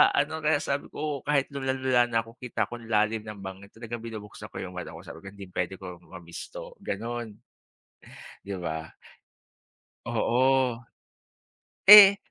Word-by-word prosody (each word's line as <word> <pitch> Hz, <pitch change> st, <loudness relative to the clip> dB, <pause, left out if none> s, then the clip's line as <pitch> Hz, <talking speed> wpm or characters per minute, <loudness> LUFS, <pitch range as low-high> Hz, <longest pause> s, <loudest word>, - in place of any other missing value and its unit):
ano, 155 Hz, +3 st, 0 dB
kaya 150 Hz, -1 st, +3 dB
sabi 140 Hz, 0 st, -2 dB
ko 150 Hz, -2 st, -3 dB
kahit 145 Hz, -2 st, +2 dB
lulang-lula 130 Hz, -2 st, +1 dB
na 115 Hz, -1 st, +1 dB
ako 115 Hz, +2 st, -15 dB
kita 115 Hz, -3 st, -1 dB
ko 120 Hz, -, -7 dB
ang 115 Hz, -, -12 dB
lalim 110 Hz, +1 st, +2 dB
ng 105 Hz, -1 st, -8 dB
bangin 95 Hz, +1 st, -9 dB
talagang 115 Hz, 0 st, -7 dB
binubuksan 110 Hz, -3 st, -8 dB
ko -, -, -9 dB
yung 90 Hz, -1 st, -8 dB
mata 85 Hz, -3 st, -6 dB
ko 85 Hz, -, -11 dB
sabi 80 Hz, +2 st, -11 dB
hindi 100 Hz, -1 st, -10 dB
puwede 90 Hz, +1 st, -3 dB
kong 90 Hz, -2 st, -10 dB
ma-miss 85 Hz, -1 st, -9 dB
to, -, -, -8 dB
ganun. 115 Hz, -2 st, -5 dB, 1.1 s
Di 100 Hz, -, -5 dB
ba? 80 Hz, -2 st, -4 dB, 1.2 s
Oo. 130 Hz, 0 st, +2 dB, 1.1 s
Eh. 200 Hz, -1 st, +12 dB
115 Hz, 150 wpm, -27 LUFS, 100-135 Hz, 1.2 s, Eh